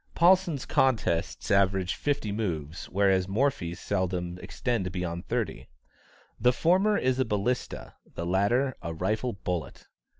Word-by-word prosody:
Paulsen's 175 Hz, -5 st, +4 dB
contests 110 Hz, -10 st, +1 dB
average 95 Hz, -2 st, +3 dB
fifty 140 Hz, -8 st, -1 dB
moves, 85 Hz, -6 st, -3 dB
whereas 95 Hz, -1 st, +2 dB
Morphy's 95 Hz, -6 st, 0 dB
seldom 90 Hz, -2 st, -2 dB
extend 115 Hz, -8 st, -2 dB
beyond 85 Hz, -1 st, -4 dB
thirty. -, -, -3 dB, 0.7 s
The 125 Hz, +3 st, +5 dB
former 190 Hz, +9 st, +3 dB
is 130 Hz, 0 st, +1 dB
a -, -, +4 dB
balista, 110 Hz, +4 st, -2 dB, 0.2 s
the 85 Hz, -, -3 dB
latter, 110 Hz, +9 st, +2 dB
a 85 Hz, -1 st, -5 dB
rifle 110 Hz, +8 st, -1 dB
bullet. 90 Hz, -3 st, -4 dB
100 Hz, 125 wpm, -28 LUFS, 90-125 Hz, 0.7 s, The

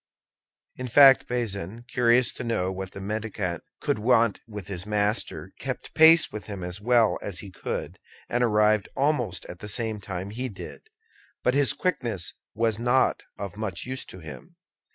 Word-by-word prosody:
In 125 Hz, -, -4 dB
fact, 135 Hz, +2 st, +7 dB
Bazin, 115 Hz, -3 st, -3 dB
curious 120 Hz, 0 st, +3 dB
to -, -, -6 dB
know 95 Hz, -6 st, 0 dB
what 95 Hz, 0 st, -6 dB
the -, -, -8 dB
mendicant 100 Hz, -4 st, -3 dB, 0.2 s
could -, -, -1 dB
want 115 Hz, -1 st, +3 dB
with 105 Hz, -4 st, -7 dB
his 95 Hz, -3 st, -3 dB
master, 105 Hz, +1 st, -1 dB
kept -, -, -5 dB
pace 160 Hz, 0 st, +7 dB
with 105 Hz, -, -7 dB
him 100 Hz, -4 st, -6 dB
as 90 Hz, +3 st, -3 dB
well 120 Hz, -1 st, +3 dB
as 100 Hz, -3 st, -3 dB
he 100 Hz, -, -10 dB
could, -, -, -5 dB, 0.3 s
and 120 Hz, +1 st, 0 dB
arrived 105 Hz, -2 st, +3 dB
almost 130 Hz, -, 0 dB
at 85 Hz, -, -9 dB
the 105 Hz, -, -7 dB
same 110 Hz, 0 st, -2 dB
time 95 Hz, 0 st, -5 dB
he 125 Hz, +4 st, -4 dB
did; 95 Hz, -5 st, -10 dB, 0.5 s
but 125 Hz, -, +3 dB
his 140 Hz, -1 st, +3 dB
quickness 120 Hz, -, -2 dB, 0.2 s
was 110 Hz, -1 st, +1 dB
not 125 Hz, +2 st, +2 dB, 0.2 s
of 100 Hz, -2 st, -6 dB
much 105 Hz, -5 st, -3 dB
use 130 Hz, +1 st, -5 dB
to -, -, -10 dB
him. 70 Hz, -5 st, -11 dB
110 Hz, 170 wpm, -26 LUFS, 95-125 Hz, 0.5 s, fact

